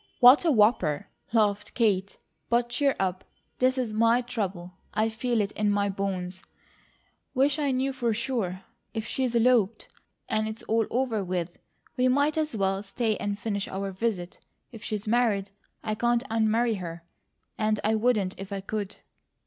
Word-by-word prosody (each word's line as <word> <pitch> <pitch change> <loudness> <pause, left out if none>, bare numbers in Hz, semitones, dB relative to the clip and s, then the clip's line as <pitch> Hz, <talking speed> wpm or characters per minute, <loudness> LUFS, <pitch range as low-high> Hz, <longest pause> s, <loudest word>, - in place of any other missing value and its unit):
"What 255 +7 +8
a - - +4
whopper!" 210 - +3 0.2
laughed 210 -3 +1
Kate. 200 -5 +1 0.3
"But 240 0 +2
cheer 275 +2 +1
up. 185 -1 -1 0.4
This 255 +1 +3
is 240 -4 -1
my 230 +3 +4
trouble. 195 -7 -4 0.2
I 220 +1 +2
feel 235 +1 -1
it 200 0 -2
in 210 -1 0
my 205 0 +1
bones. 185 -2 -3 0.9
Wish 275 +3 +3
I 290 -2 +1
knew 265 +1 0
for 240 -3 0
sure. 215 -6 -2 0.3
If 220 -1 -2
she's 255 -3 -1
eloped, 230 -3 +3 0.4
and 215 0 0
it's 220 +2 -6
all 225 -1 +1
over 240 -4 0
with, 180 -2 -2 0.5
we 255 0 +3
might 285 +4 +3
as 310 -5 -1
well 195 -1 0
stay 215 +2 -1
and 205 -1 -2
finish 205 -2 -2
our 195 +1 -3
visit. 190 -3 -3 0.3
If 225 -3 -11
she's 210 -1 -3
married, 210 -4 +2 0.3
I 215 - -1
can't 240 +2 +1
unmarry 225 0 +2
her, 170 -1 -7 0.6
and 215 -1 +1
I 215 - +2
wouldn't 215 -4 +2
if 195 +1 -7
I 195 -1 -3
could." 205 0 -4
220 Hz, 165 wpm, -27 LUFS, 195-240 Hz, 0.9 s, What